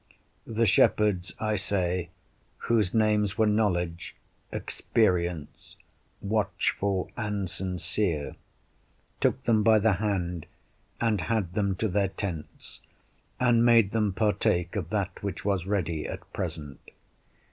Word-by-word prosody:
The 115 +1 +1
shepherds, 100 -2 +3
I 110 -1 0
say, 90 -3 -1 0.5
whose 110 -6 +1
names 105 -2 +2
were 110 - +4
Knowledge, 90 -6 0 0.4
Experience, 85 -7 -1 0.5
Watchful, 100 -2 0
and 105 -4 -2
Sincere, 90 -3 -2 0.8
took 130 - +1
them 110 -2 +3
by 110 0 +5
the 110 0 +3
hand, 90 -6 -2 0.5
and 110 -5 +1
had 105 -6 -1
them 100 -1 0
to 110 - -1
their 100 0 +1
tents, 90 -5 -7 0.6
and 120 -2 +4
made 115 -4 +5
them 105 -3 +1
partake 95 -3 +1
of 90 -6 -3
that 100 -2 -2
which 100 -2 -5
was 95 -3 0
ready 85 -6 -1
at - - -8
present. 75 -3 -5
100 Hz, 115 wpm, -27 LUFS, 90-110 Hz, 0.8 s, by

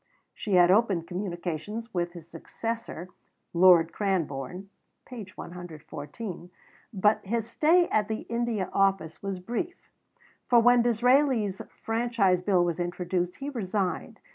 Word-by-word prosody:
She 205 -3 -2
had 175 0 +6
opened 195 -5 +3
communications 185 +5 -5
with 175 -1 -1
his 170 -2 -11
successor, 205 +2 -6 0.4
Lord 170 -2 +6
Cranborne 180 -2 -2 0.4
(p. 235 -6 -8
114); 175 +2 -8 0.4
but 210 0 +2
his 225 +2 -2
stay 335 +8 +3
at 210 -1 +1
the 220 0 -3
India 235 -4 -2
Office 195 -5 +1
was 195 -2 -4
brief, 245 - -5 0.6
for 240 - +6
when 245 +1 +5
Disraeli's 240 -3 +2
Franchise 225 -5 0
Bill 180 -2 +3
was 175 0 -2
introduced, 175 0 -2
he 280 +1 -5
resigned. 195 -6 -2
195 Hz, 120 wpm, -27 LUFS, 175-230 Hz, 0.6 s, had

